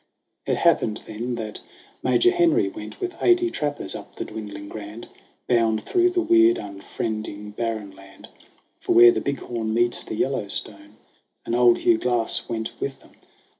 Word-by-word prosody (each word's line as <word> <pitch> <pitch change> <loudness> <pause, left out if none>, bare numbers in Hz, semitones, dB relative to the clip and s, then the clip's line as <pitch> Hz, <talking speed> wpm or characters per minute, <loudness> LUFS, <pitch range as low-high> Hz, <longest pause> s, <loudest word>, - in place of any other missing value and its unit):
It - - +1
happened 105 - +2
then 120 +3 -4
that 110 -2 -6 0.4
Major 360 - +4
Henry 345 -2 +3
went - - -9
With 370 -2 -4
eighty 355 -1 +4
trappers 145 - -3
up - - -10
the - - -4
dwindling 105 -2 -8
Grand, 105 +2 -8 0.4
.Bound 115 -3 +2
through 360 0 +3
the 360 0 0
weird, 340 +1 +5
unfriending 105 +1 -5
barren 110 -3 -3
land 95 0 -15 0.5
For - - 0
where 120 0 +9
the 110 - -2
Big 140 0 -2
Horn 110 -2 -3
meets 120 +1 +1
the - - -6
Yellowstone; 105 -4 -3 0.5
And - - -3
old 120 0 +5
Hugh 115 -1 +3
Glass 120 -2 -1
went 110 -1 -3
with 135 -1 -4
them. - - -20
115 Hz, 160 wpm, -24 LUFS, 110-140 Hz, 0.5 s, where